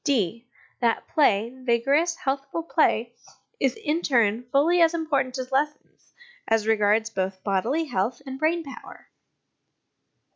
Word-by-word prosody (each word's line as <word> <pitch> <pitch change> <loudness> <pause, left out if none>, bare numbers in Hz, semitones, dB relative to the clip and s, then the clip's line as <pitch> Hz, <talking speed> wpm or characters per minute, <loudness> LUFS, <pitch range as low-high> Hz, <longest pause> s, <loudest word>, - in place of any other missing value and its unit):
(d) 230 - 0 0.3
That 230 -2 0
play, 230 -5 +2
vigorous 265 +7 +1
healthful 275 +4 -3
play, 240 -8 +1 0.5
is, 265 -2 +1
in 300 +2 -1
its 340 - -4
turn, 235 -1 +2
fully 335 +6 +3
as 330 0 +4
important 275 -5 -1
as 255 0 -6
lessons, 295 +3 -3 0.4
as 225 -1 +2
regards 220 0 +2
both 190 -2 -3
bodily 225 - 0
health 240 -1 -2
and 265 0 -7
brain 330 +2 +1
power. 275 -4 -12
255 Hz, 135 wpm, -25 LUFS, 225-300 Hz, 0.5 s, as